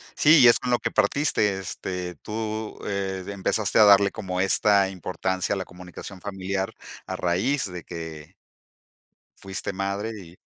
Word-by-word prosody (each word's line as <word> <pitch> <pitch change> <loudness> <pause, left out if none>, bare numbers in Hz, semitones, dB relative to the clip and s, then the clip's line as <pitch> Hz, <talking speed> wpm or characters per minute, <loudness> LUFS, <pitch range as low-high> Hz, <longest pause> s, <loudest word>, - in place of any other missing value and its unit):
Sí, 155 +1 +6
y 125 - +9
es 120 - +6
con 125 - -4
lo 120 - +3
que - - -2
partiste, 105 -9 +2
este, 90 -1 -5
tú, 110 +4 -5
eh, 95 -2 -2
de - - -5
empezaste 100 +2 0
a - - +9
darle 100 0 +6
como 90 -4 -3
esta 100 0 +3
importancia 95 0 -2
a - - -3
la 95 - -4
comunicación 90 +2 -10
familiar 95 -1 -3 0.3
a - - -4
raíz 95 +7 0
de 90 -2 -7
que 80 -2 -8 1.1
fuiste 95 +1 -4
madre 100 +3 -2
y 85 -1 -13
95 Hz, 160 wpm, -25 LUFS, 90-105 Hz, 1.1 s, y